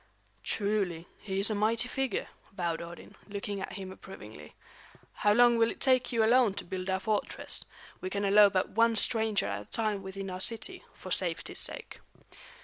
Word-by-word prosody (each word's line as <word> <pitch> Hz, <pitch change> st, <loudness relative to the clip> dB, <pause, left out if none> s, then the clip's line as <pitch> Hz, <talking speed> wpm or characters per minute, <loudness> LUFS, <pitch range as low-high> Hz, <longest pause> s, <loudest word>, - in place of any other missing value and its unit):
"Truly, 200 Hz, -5 st, -1 dB
he 195 Hz, -2 st, -3 dB
is 200 Hz, +3 st, +6 dB
a -, -, +1 dB
mighty 225 Hz, +4 st, +2 dB
figure," 270 Hz, 0 st, -2 dB, 0.2 s
vowed 170 Hz, -4 st, -2 dB
Odin, 170 Hz, 0 st, -10 dB
looking 200 Hz, -1 st, -5 dB
at -, -, -5 dB
him 190 Hz, -1 st, -7 dB
approvingly. 105 Hz, -, -12 dB, 0.6 s
"How 205 Hz, -, +2 dB
long 240 Hz, +1 st, +5 dB
will 225 Hz, 0 st, +4 dB
it -, -, -7 dB
take 255 Hz, -1 st, +3 dB
you 230 Hz, -2 st, +2 dB
alone 235 Hz, -2 st, +4 dB
to -, -, -5 dB
build 185 Hz, +1 st, -5 dB
our 190 Hz, 0 st, +1 dB
fortress? 210 Hz, +2 st, -2 dB, 0.4 s
We 185 Hz, -, -3 dB
can 200 Hz, +1 st, -2 dB
allow 205 Hz, +1 st, +7 dB
but 190 Hz, -2 st, 0 dB
one 230 Hz, +1 st, +3 dB
stranger 220 Hz, -1 st, +2 dB
at 100 Hz, 0 st, -3 dB
a -, -, -12 dB
time 215 Hz, -, 0 dB
within 195 Hz, 0 st, -6 dB
our 185 Hz, 0 st, -2 dB
city, 235 Hz, -, -1 dB
for -, -, -10 dB
safety's -, -, -1 dB
sake." -, -, -5 dB
200 Hz, 180 wpm, -30 LUFS, 190-225 Hz, 0.6 s, allow